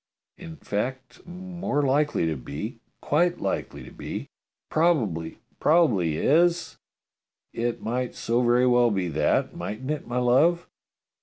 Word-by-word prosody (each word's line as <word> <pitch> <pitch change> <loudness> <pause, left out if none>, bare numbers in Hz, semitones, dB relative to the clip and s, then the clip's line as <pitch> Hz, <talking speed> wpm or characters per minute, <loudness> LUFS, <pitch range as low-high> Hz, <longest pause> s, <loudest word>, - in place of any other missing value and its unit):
In 165 -3 -9
fact, 130 - -5
more 175 -4 -3
likely 140 - +1
to 80 -1 -1
be, 80 - -6 0.2
quite 175 +4 +1
likely - - -3
to - - -12
be. - - -6 0.4
Probably 115 - +1
is, - - -23 0.2
prob 165 -1 +4
ably 85 -7 0
is. 170 - +2 0.7
It 120 0 -2
might 125 +2 -2
so 120 +2 0
very 120 +1 +3
well 120 -1 +4
be 95 -5 -1
that, 75 -1 0
mightn't 130 +7 -5
it, 155 - -4
my 120 +1 -3
love?" 140 +8 +3
125 Hz, 140 wpm, -25 LUFS, 110-160 Hz, 0.7 s, prob